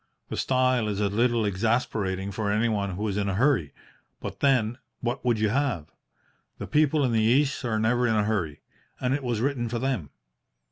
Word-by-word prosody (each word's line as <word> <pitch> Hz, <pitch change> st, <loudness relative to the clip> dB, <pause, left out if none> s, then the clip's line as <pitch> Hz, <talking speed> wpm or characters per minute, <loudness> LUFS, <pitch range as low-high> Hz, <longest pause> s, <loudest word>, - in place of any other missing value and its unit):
The -, -, -3 dB
style 130 Hz, -3 st, +2 dB
is 105 Hz, -1 st, -2 dB
a 105 Hz, -1 st, +1 dB
little 115 Hz, +2 st, +2 dB
exasperating 100 Hz, -2 st, -1 dB
for 105 Hz, 0 st, -2 dB
anyone 105 Hz, -3 st, 0 dB
who 105 Hz, +3 st, -2 dB
is 100 Hz, -1 st, -2 dB
in 100 Hz, -1 st, 0 dB
a 95 Hz, -, -1 dB
hurry. 110 Hz, -, +2 dB, 0.5 s
But, -, -, -7 dB
then, 120 Hz, -4 st, +2 dB, 0.2 s
what 120 Hz, 0 st, -3 dB
would 120 Hz, -3 st, +2 dB
you 110 Hz, -1 st, +2 dB
have? 125 Hz, -, -1 dB, 0.7 s
The -, -, -5 dB
people 150 Hz, 0 st, +2 dB
in 125 Hz, -, +1 dB
the 115 Hz, -, +2 dB
East 135 Hz, +6 st, +2 dB
are 110 Hz, -2 st, 0 dB
never 120 Hz, +3 st, +2 dB
in 110 Hz, -, +2 dB
a 105 Hz, -, +3 dB
hurry, 100 Hz, -9 st, -2 dB, 0.4 s
and 125 Hz, 0 st, 0 dB
it 145 Hz, -, -1 dB
was 120 Hz, -3 st, -1 dB
written 125 Hz, -3 st, -1 dB
for 120 Hz, -, -2 dB
them. 120 Hz, -, -2 dB
115 Hz, 195 wpm, -26 LUFS, 105-125 Hz, 0.7 s, a